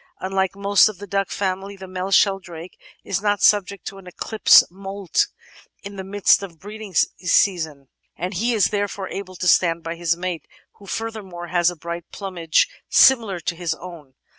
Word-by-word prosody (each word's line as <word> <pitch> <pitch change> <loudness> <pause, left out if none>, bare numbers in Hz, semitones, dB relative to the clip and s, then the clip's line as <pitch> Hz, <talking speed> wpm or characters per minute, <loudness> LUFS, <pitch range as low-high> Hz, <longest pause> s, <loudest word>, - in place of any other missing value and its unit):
Unlike 190 0 -1
most 200 +1 +4
of 210 - -9
the 205 - -8
duck 195 0 -1
family 195 0 -3
the 190 - -9
male 185 +1 -4
Sheldrake 185 -4 +1 0.3
is 195 - -2
not 205 -1 0
subject 200 -1 +3
to 195 - -7
an 185 - -15
"eclipse" 215 +4 +5
moult 195 0 -1 0.6
in 200 0 -8
the 190 - -6
midst 200 +1 +3
of 195 -4 -7
the - - -26
breeding 205 +1 -10
season, 160 -6 +1 0.3
and 180 +4 -4
he 230 +6 0
is 205 -4 +2
therefore 205 -2 -3
able 185 -2 -7
to 180 0 -3
stand 170 -2 +3
by 165 - -4
his 170 0 -1
mate, 175 -2 -4 0.3
who, 200 - -15
furthermore, 195 -6 -6
has 175 -1 +3
a 175 - -7
bright 170 +1 -7
plumage 175 -5 0 0.2
similar 225 -8 +5
to 170 - -3
his 165 -2 -2
own. 160 -7 -12
190 Hz, 180 wpm, -22 LUFS, 175-200 Hz, 0.6 s, eclipse